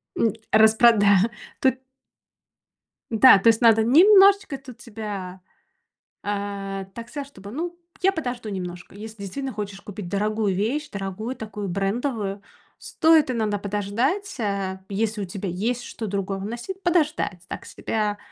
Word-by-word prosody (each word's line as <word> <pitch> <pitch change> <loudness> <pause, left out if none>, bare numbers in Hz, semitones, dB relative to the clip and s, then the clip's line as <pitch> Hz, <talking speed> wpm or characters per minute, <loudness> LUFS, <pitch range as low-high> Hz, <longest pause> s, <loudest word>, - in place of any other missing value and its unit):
М. 230 - +1 0.2
Распрода 220 -2 +5 0.3
тут. 260 -2 +3 1.3
Да, 230 -1 +8
то 210 - +1
есть 225 +1 +5
надо 225 -2 +6
немножечко 390 - +6
тут 260 -3 -13
себя 205 -6 -7 0.8
А, 200 -1 -4
так 235 0 -8
сказать, 280 +1 -6
чтобы, 200 -7 -12
ну, 345 +6 -4 0.2
я 385 - +4
подожду 250 - -4
немножко, 180 -1 -6
если 215 0 -9
действительно 270 +7 -4
хочешь 200 -2 -6
купить 205 -2 -8
дорогую 210 0 0
вещь, 260 +10 -1
дорогую, 200 +5 -5
такую 210 -3 -6
брендовую, 200 +2 -2 0.4
стоит 320 -4 +3
иногда 215 -4 -1
подождать, 230 - -2
а, 195 -3 -2
если 210 +1 -1
у - - -2
тебя 190 +1 -5
есть 230 +8 -2
что 225 - -6
другого 195 0 -3
носить, 240 - -6
подождать. 310 - 0
Так - - -6
себя 210 -2 -2
220 Hz, 135 wpm, -24 LUFS, 200-255 Hz, 1.3 s, Да